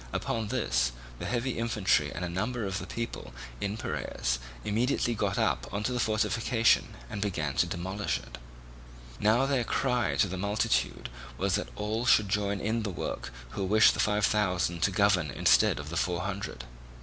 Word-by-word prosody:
Upon 115 -2 -2
this 60 - 0 0.3
the - - -4
heavy 120 0 -1
infantry 105 -10 +2
and 90 - -4
a - - -2
number 110 +6 -2
of 95 -1 -2
the - - -7
people 115 - -5 0.2
in 100 +1 -2
Piraeus - - -2 0.3
immediately 120 +3 +1
got 100 -2 -1
up - - 0
on 100 +2 -2
the 125 +2 -1
fortification 115 +1 +2
and 100 - -5
began 80 -8 -1
to - - +3
demolish 95 +4 -2
it. - - -11 0.8
Now 110 +5 +4
their 135 -3 +1
cry 125 -1 0
to 100 - +3
the 95 +1 -4
multitude 100 - 0 0.3
was - - 0
that - - -1
all 110 - -2
should 105 -3 +5
join 100 0 0
in 110 +3 0
the 105 - -2
work 85 -8 -4 0.2
who 100 - -3
wished 105 +3 +5
the - - -5
Five 105 0 +3
Thousand 90 -5 +1
to 100 - +4
govern 95 -5 +3
instead 60 +1 +4
of 75 +1 -7
the 85 - -2
Four 90 0 0
Hundred. 100 -9 -4
100 Hz, 175 wpm, -29 LUFS, 90-110 Hz, 0.8 s, should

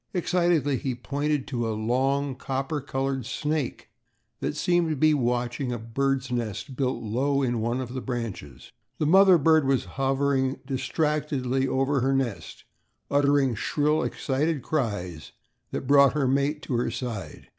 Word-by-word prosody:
Excitedly 175 -6 +2
he 130 0 -3
pointed 145 +3 -2
to 120 -4 -2
a 110 - -2
long, 135 +5 0
copper 135 +3 -3
colored 135 -1 -2
snake, 150 +3 -3 0.5
that - - -2
seemed 175 -2 +2
to 155 - 0
be 155 +2 +4
watching 125 -1 -1
a 120 - -2
bird's 130 +3 -1
nest 120 +3 -3
built 130 -2 -1
low 135 +6 0
in 120 -3 0
one 120 +3 -1
of 125 -1 -5
the 130 - -4
bushes. 115 - -6 0.3
The 155 - 0
mother 190 +3 +7
bird 155 -1 +4
was 135 -1 +1
hovering 135 0 0
distractedly 135 -1 -1
over 135 +2 +1
her 135 +2 +2
nest, 130 -6 -3 0.5
uttering 140 -2 +3
shrill, 150 +7 +1
excited 145 0 -1
cries 100 - -3 0.4
that - - -4
brought 140 0 +6
her 140 -3 +1
mate 140 +3 0
to - - -4
her 120 - 0
side. 120 -4 -6
135 Hz, 150 wpm, -26 LUFS, 125-145 Hz, 0.5 s, mother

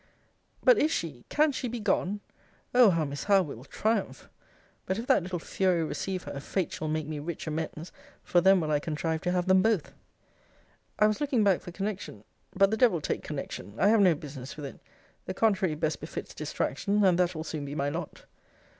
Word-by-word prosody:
But - - +6
is 305 - +3
she, 150 - -3
can 305 0 +3
she 260 -1 -3
be 240 0 -4
gone! 205 -1 0 0.5
Oh! 245 -3 +7
how 165 -4 +1
Miss 140 0 -5
Howe 200 -2 +5
will 140 -7 -8
triumph! 215 +8 -2 0.6
But 190 - 0
if 230 - -4
that - - +4
little 180 +1 -4
fury 180 0 0
receive 185 +3 -3
her, 140 - -6
fate 180 +5 -2
shall 155 - -4
make 155 0 -1
me 155 0 -5
rich 165 +3 -5
amends; 160 +1 -4 0.3
for 175 - +3
then 190 +1 +6
will 155 -2 -1
I 150 - +3
contrive 160 +1 -2
to 180 - 0
have 180 -1 0
them 190 0 +5
both. 215 -5 +1 1.0
I 210 - +5
was 215 +5 +1
looking 270 -6 +2
back 195 -3 +3
for 175 - -9
connection 195 - -5 0.3
but 195 +1 +4
the 220 - +1
devil 220 -8 +4
take - - -2
connection; 100 - -6
I 200 - +4
have 220 -1 +5
no 180 -4 +5
business 140 -3 -8
with 150 - -6
it: 135 - -9 0.5
the 185 - -4
contrary 190 -7 +2
best 155 0 -1
befits - - -7
distraction, 205 0 0
and 180 -2 +4
that 180 -1 +2
will 155 - -4
soon 155 -2 -5
be 140 +1 -6
my 140 -1 0
lot! 160 +1 -6
180 Hz, 205 wpm, -28 LUFS, 155-205 Hz, 1.0 s, Oh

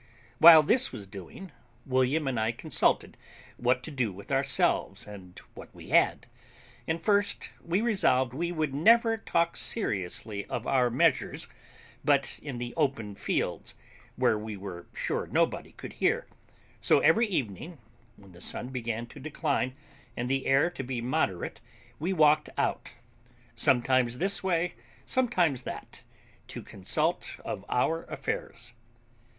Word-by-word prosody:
While 160 -1 +10
this 250 - +4
was 110 -6 -7
doing, 100 - -10 0.3
William 130 +3 +1
and 125 -4 -1
I 110 +1 0
consulted 150 +5 +1 0.4
what 125 +1 +1
to 160 - -7
do 125 -7 -1
with 100 +5 -11
ourselves 135 0 +1
and 95 -4 -12 0.2
what - - -11
we - - -11
had; - - +3 0.6
and 160 +1 -1
first, 205 +4 0
we 175 +4 0
resolved 130 - +2
we 170 +5 -2
would 155 -5 -2
never 225 - +5
talk 170 -6 0
seriously 100 - -2
of - - -4
our 125 -2 +2
measures 135 +3 +1 0.6
but - - +1
in 140 -4 -6
the 120 0 -5
open 130 -9 -1
fields, - - -2 0.4
where 110 - +2
we 105 -1 -6
were 95 -3 -8
sure - - -2
nobody - - 0
could - - -9
hear; - - +2 0.6
so - - +4
every 220 +10 +4
evening, 155 - -3 0.4
when 100 -1 -17
the 85 0 -15
sun 125 - -2
began 115 -3 -3
to - - -13
decline 145 -4 -2 0.4
and 120 +1 -2
the 135 0 0
air 140 +6 +3
to - - -6
be 130 -1 -4
moderate 115 -7 -2 0.4
we 170 +5 -1
walked 155 -3 +4
out, - - -1 0.6
sometimes 125 0 +2
this 195 +6 0
way, 180 -1 0 0.3
sometimes 180 - +1
that, - - -8 0.5
to - - -8
consult 155 - -1
of 95 - -4
our 165 +7 0
affairs. 120 +1 -5
135 Hz, 140 wpm, -28 LUFS, 115-165 Hz, 0.6 s, While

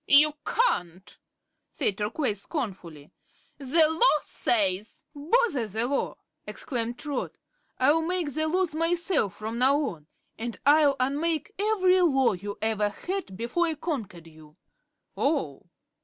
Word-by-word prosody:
"You 295 +1 +6
can't," 185 - -1 0.6
said 195 - -1
Turquoise, 210 0 -1
scornfully; 185 - -6 0.5
"the 305 +4 +4
Law 320 +1 +3
says 205 -2 0
" - - -51
"Bother 295 - +1
the 220 +3 -1
Law!" 275 +2 -1 0.3
exclaimed 240 -3 -4
Trot. 290 -4 -4 0.4
"I'll 290 +5 +4
make 335 -3 -2
the 315 +1 0
Laws 360 0 0
myself, 330 - 0
from 220 +2 -5
now 270 +3 +4
on, 155 -3 -12 0.3
and 235 0 -5
I'll 290 -1 +5
unmake 305 +8 -1
every 375 -3 +3
Law 270 -9 +3
you 200 +2 -6
ever 215 -2 +1
had 350 - -5
before 245 - 0
I 320 - -1
conquered 225 - -5
you." 155 -2 -16 0.6
"Oh. - - -2
275 Hz, 130 wpm, -27 LUFS, 210-325 Hz, 0.6 s, You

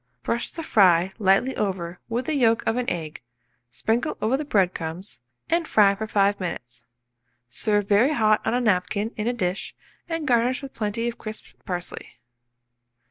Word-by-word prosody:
Brush 235 - -1
the 330 - -6
fry 185 - +4
lightly 200 +6 +3
over 180 -4 -3
with 240 +2 -1
the 315 - -1
yolk 230 -5 +3
of 225 - +1
an 250 0 -1
egg, 160 -3 -5 0.5
sprinkle 230 - -1
over 220 +5 +1
the 290 - -2
bread 195 -10 +2
crumbs, 165 - -6 0.3
and 335 -1 +1
fry 200 -2 +5
for 215 +2 -5
5 200 -1 +2
minutes. 120 -10 -6 0.6
Serve 205 - +1
very 225 +9 +4
hot 215 -5 +3
on - - 0
a 250 - +1
napkin 205 +1 0
in 215 +1 -3
a - - +3
dish, 185 -5 -3 0.3
and 330 -2 -3
garnish 250 +2 +2
with 275 - -8
plenty 220 +2 -2
of 235 - -4
crisped 215 0 -8
parsley. 180 -1 -5
215 Hz, 170 wpm, -24 LUFS, 185-240 Hz, 0.6 s, fry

